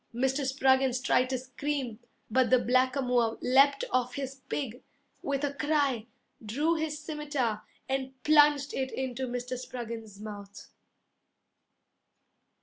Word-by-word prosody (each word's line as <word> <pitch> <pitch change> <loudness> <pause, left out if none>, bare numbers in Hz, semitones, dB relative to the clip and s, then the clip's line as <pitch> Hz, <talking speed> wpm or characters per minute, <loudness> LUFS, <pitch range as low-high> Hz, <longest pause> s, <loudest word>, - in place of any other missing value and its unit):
Mr. 265 +3 +1
Spruggins 265 -1 +3
tried 255 0 +2
to 260 - 0
scream, 260 -2 -4 0.3
But 255 0 +3
the 255 - +6
blackamoor 250 -1 +2
Leapt 275 +2 +4
off 250 -1 0
his 270 -1 -4
pig 250 -3 -3 0.4
With 280 0 -2
a 285 -1 0
cry, 280 -6 0 0.4
Drew 285 +10 +1
his 315 -2 -2
scimitar, 295 -8 -2 0.3
And 265 0 -2
plunged 295 -2 +5
it 265 0 -2
into 260 0 -3
Mr. 250 +1 -4
Spruggins's 230 -5 -7
mouth. 205 -2 -9
260 Hz, 120 wpm, -29 LUFS, 245-280 Hz, 0.4 s, the